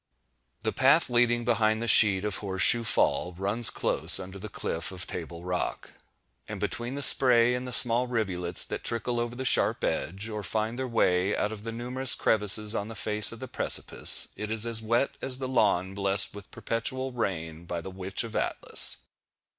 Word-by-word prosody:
The - - -3
path - - +2
leading 120 0 0
behind 110 -2 0
the 115 - -5
sheet 105 -3 +5
of 105 - -3
Horse 95 -2 -3
Shoe 120 -1 +4
Fall, 90 -4 -1
runs 100 +6 0
close - - +4
under 95 +1 -10
the 110 +3 -9
cliff 80 -5 -5
of 90 -2 -8
Table 85 0 -9
Rock; 90 0 -5 0.6
and - - -8
between 120 +3 -5
the 145 - -3
spray 125 -3 +5
and 125 +1 -5
the - - -8
small 120 0 +5
rivulets 95 -8 -1
that - - -8
trickle 120 +1 -3
over 120 0 -5
the 130 +1 -7
sharp - - 0
edge, 95 +5 -4
or 105 -1 -7
find 110 +3 -4
their 130 - -4
way 95 -5 -1
out 105 - -3
of 110 -2 -9
the 115 - -6
numerous 125 +2 0
crevices 105 0 +2
on 100 - -4
the 115 - -10
face 105 0 +4
of 115 - -10
the 130 - -8
precipice, - - +5
it 105 - -7
is 110 0 +2
as 115 -1 +1
wet 115 +5 -1
as 130 -1 +1
the 130 -1 -6
lawn 100 -7 -1
blessed 100 0 -1
with 100 0 -13
"perpetual 130 +3 -5
rain" 85 -8 -6
by 85 0 -6
the 95 +3 -10
Witch 95 +3 -3
of 115 - -10
Atlas. - - -1
110 Hz, 195 wpm, -25 LUFS, 95-120 Hz, 0.6 s, sheet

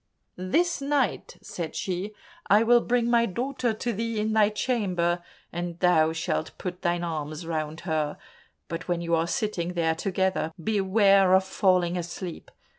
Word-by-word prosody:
This 310 - 0
night," 275 -5 -1
said 165 -3 -6
she, 190 +3 -3 0.3
"I 210 +3 +5
will 240 +1 +5
bring 240 -1 +1
my 235 -1 +3
daughter 245 +4 -1
to 230 +2 -3
thee 225 +1 -2
in 215 +1 0
thy 215 -1 +4
chamber, 185 -7 0 0.3
and 175 0 -4
thou 160 -4 +4
shalt 160 -1 -3
put 180 -1 -6
thine 175 -1 0
arms 155 -1 -4
round 160 -1 -3
her, 155 -4 -1 0.5
but 165 +1 -5
when 175 -1 -1
you 170 0 -2
are 165 0 +2
sitting 180 -2 -2
there 165 -2 +1
together, 190 -1 -1
beware 195 -2 +4
of 190 - +4
falling 185 -2 +2
asleep. 175 0 -6
185 Hz, 155 wpm, -26 LUFS, 170-215 Hz, 0.5 s, I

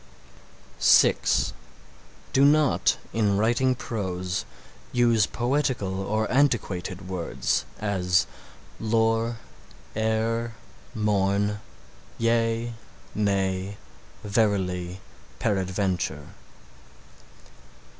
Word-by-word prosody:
(6) - - +4 0.8
Do 135 - +4
not 150 +1 +4 0.2
in 105 -3 +2
writing 120 +4 +2
prose, 95 - -3 0.5
use 120 -3 +3
poetical 120 -7 -1
or 110 +3 0
antiquated 100 -9 0
words: 90 -3 -1
as 95 -4 +1 0.5
"lore, 115 +1 +1 0.6
e'er, 110 +1 0 0.4
morn, 105 -1 +1 0.6
yea, 115 0 +1 0.4
nay, 100 -1 0 0.5
verily, 95 -4 0 0.4
peradventure." 95 - -1
105 Hz, 65 wpm, -26 LUFS, 95-115 Hz, 0.8 s, 6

